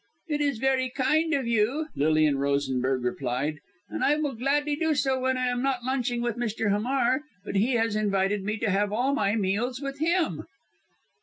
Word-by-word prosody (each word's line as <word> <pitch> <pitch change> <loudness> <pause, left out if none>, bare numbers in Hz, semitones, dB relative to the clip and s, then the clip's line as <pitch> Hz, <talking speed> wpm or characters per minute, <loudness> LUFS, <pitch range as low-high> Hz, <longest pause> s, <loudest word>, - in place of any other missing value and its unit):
"It 295 -2 -1
is 285 -4 +1
very 260 +1 +1
kind 305 +5 +1
of 270 -3 -1
you," 235 +7 +1
Lilian 155 -1 +2
Rosenberg 135 -2 0
replied, 130 +4 -2 0.3
"and - - -4
I 290 - +4
will 300 -2 -1
gladly 290 +5 0
do 320 0 +1
so 265 -2 +1
when 260 0 0
I 255 - 0
am 245 0 -1
not 265 -2 -1
lunching 245 -2 -1
with 240 -1 -2
Mr. 225 -3 -1
Hamar. 250 +5 +1 0.2
But - - -5
he 230 +7 +2
has 225 -2 +1
invited 200 -1 +1
me 215 +2 -2
to 215 -2 0
have 200 +1 +1
all 250 +6 +1
my 215 -7 +1
meals 220 +5 -1
with 275 0 -5
him." 335 +1 0
240 Hz, 185 wpm, -27 LUFS, 200-275 Hz, 0.3 s, I